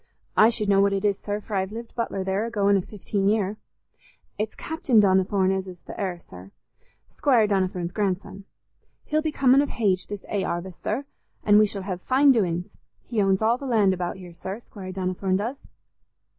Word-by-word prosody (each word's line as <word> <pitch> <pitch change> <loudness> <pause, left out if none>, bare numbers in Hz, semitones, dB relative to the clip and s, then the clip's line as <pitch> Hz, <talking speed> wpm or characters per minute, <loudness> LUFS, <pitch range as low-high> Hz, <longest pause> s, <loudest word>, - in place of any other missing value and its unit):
I 215 - +7
should 220 -3 -2
know 195 -1 +4
what 200 0 +3
it 195 +1 -1
is, 200 -1 +1
sir, 205 0 -3
for 210 +1 -10
I've 190 0 -1
lived 230 +1 -8
butler 215 -5 -2
there 190 +2 0
a - - -4
going 200 -3 +2
i' 195 - +2
fifteen 200 0 -3
year. 210 -1 +1 0.8
It's 215 +1 -3
Captain 310 - +1
Donnithorne 190 -1 +3
as 190 0 -3
is 180 -2 -11
th' - - -9
heir, 185 -3 -3
sir—Squire 170 - -3
Donnithorne's 185 -3 -1
grandson. 195 0 -3 0.6
He'll 310 +1 0
be 310 -1 -1
comin' 275 -1 +4
of 290 - -1
hage 195 -5 0
this 205 -1 -7
'ay 200 -2 -1
'arvest, 175 +1 -4
sir, 255 +7 -2 0.4
an' 210 0 +6
we 215 - +5
shall 200 -1 -5
hev 185 -2 -4
fine 270 +5 +4
doin's. 180 -7 +1 0.4
He 225 -3 -1
owns 195 +1 +2
all 230 +3 +3
the 275 - -6
land 210 -6 +3
about 180 0 -3
here, 180 -2 -11
sir, 190 +4 -6
Squire 195 -5 -9
Donnithorne 185 0 -1
does." 235 +7 -3
200 Hz, 195 wpm, -25 LUFS, 190-220 Hz, 0.8 s, I